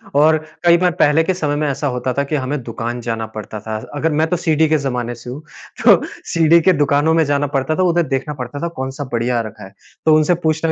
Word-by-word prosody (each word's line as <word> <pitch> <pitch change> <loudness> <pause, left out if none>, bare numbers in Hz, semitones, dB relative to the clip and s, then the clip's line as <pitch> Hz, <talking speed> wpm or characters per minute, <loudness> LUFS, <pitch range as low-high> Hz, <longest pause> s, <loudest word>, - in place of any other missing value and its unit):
और 155 +2 +5 0.3
कई 170 0 +6
बार 180 0 +2
पहले 150 +2 +4
के 185 - 0
समय 150 -5 -1
में 150 0 0
ऐसा 145 +2 -2
होता 125 +1 -2
था 140 - +2
कि 150 +2 -3
हमें 140 +1 -2
दुकान 120 +1 -5
जाना 115 -1 -3
पड़ता 110 0 -6
था, 110 +1 -5 0.2
अगर 160 +2 0
मैं 155 +2 +1
तो 180 - 0
सीडी 160 -2 +2
के 155 - +3
ज़माने 125 -3 -3
से 120 +1 -11
हूँ, 135 +5 -7 0.4
तो - - +7 0.3
सीडी 165 0 +5
के 185 +3 +4
दुकानों 145 +3 +2
में 165 -1 +4
जाना 145 0 0
पड़ता 135 +4 -1
था। 185 - +1
उधर 175 -1 +2
देखना 140 +3 -2
पड़ता 135 +4 -7
था 170 - -2
कौन-सा 130 +2 -4
बढ़िया 120 +1 0
आ - - +1
रखा 105 - -12
है, 95 +1 -12 0.3
तो 155 - +6
उनसे 155 +3 +3
पूछना 160 +1 +1
145 Hz, 245 wpm, -18 LUFS, 125-160 Hz, 0.4 s, तो